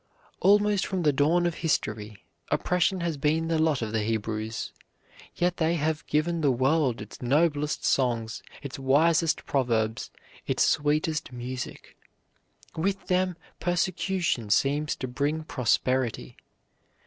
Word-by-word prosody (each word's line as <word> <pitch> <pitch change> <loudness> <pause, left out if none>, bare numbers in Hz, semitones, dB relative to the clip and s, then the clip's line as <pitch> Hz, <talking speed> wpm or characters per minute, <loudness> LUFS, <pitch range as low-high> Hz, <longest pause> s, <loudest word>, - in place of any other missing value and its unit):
Almost 205 0 +3
from 185 -2 -2
the 150 -2 +3
dawn 160 +6 +3
of 175 - +1
history, 105 -9 -2 0.2
oppression 180 +1 +1
has 170 -3 -1
been 155 +3 +1
the 165 -1 +1
lot 155 -6 +2
of 110 - -3
the 110 -1 0
Hebrews, 110 0 -3 0.6
yet 175 0 0
they 165 0 +1
have 155 -1 -1
given 165 +2 0
the 145 - +3
world 130 0 +2
its 105 - -10
noblest 150 +3 +1
songs, 120 -4 0 0.2
its 140 -1 -6
wisest 155 +5 +3
proverbs, 115 -5 0 0.4
its - - +2
sweetest 155 -1 +1
music. 125 +1 -7 0.8
With 195 +4 -1
them 180 -1 +1 0.2
persecution 175 - 0
seems 145 +8 +2
to 130 - -5
bring 145 +5 -1
prosperity. 130 -3 0
150 Hz, 125 wpm, -27 LUFS, 125-170 Hz, 0.8 s, Almost